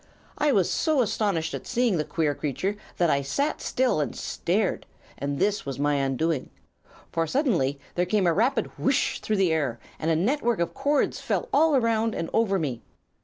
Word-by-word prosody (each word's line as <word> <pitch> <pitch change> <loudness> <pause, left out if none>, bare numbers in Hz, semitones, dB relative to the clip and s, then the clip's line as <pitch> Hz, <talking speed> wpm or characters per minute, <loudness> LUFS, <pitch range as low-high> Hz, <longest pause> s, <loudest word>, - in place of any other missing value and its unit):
I 295 -1 +2
was 195 -8 +3
so 310 -5 +2
astonished 195 -7 -1
at - - -6
seeing 240 -6 +1
the 155 - 0
queer 155 -3 0
creature 155 +9 -2 0.2
that 170 -3 +3
I 140 - +2
sat 280 - -1
still 250 -11 +1
and 140 - -3
stared, - - -1 0.3
and 140 +1 -3
this 205 +5 +1
was 135 -2 -5
my 145 +1 +1
undoing. 135 +2 0 0.6
For 165 0 0
suddenly 165 - +1
there 180 0 0
came 205 0 +2
a 170 - +4
rapid 235 - +2
'whish!' 270 0 +1
through 215 - -1
the 185 -4 +3
air, 140 -7 -1 0.2
and 160 - -1
a 165 - +3
network 240 - +1
of 170 0 -1
cords 285 +7 0
fell - - -1
all 315 -2 +4
around 230 -3 +1
and 165 - -3
over 215 -4 +2
me. 140 -9 -3
185 Hz, 185 wpm, -26 LUFS, 150-240 Hz, 0.6 s, a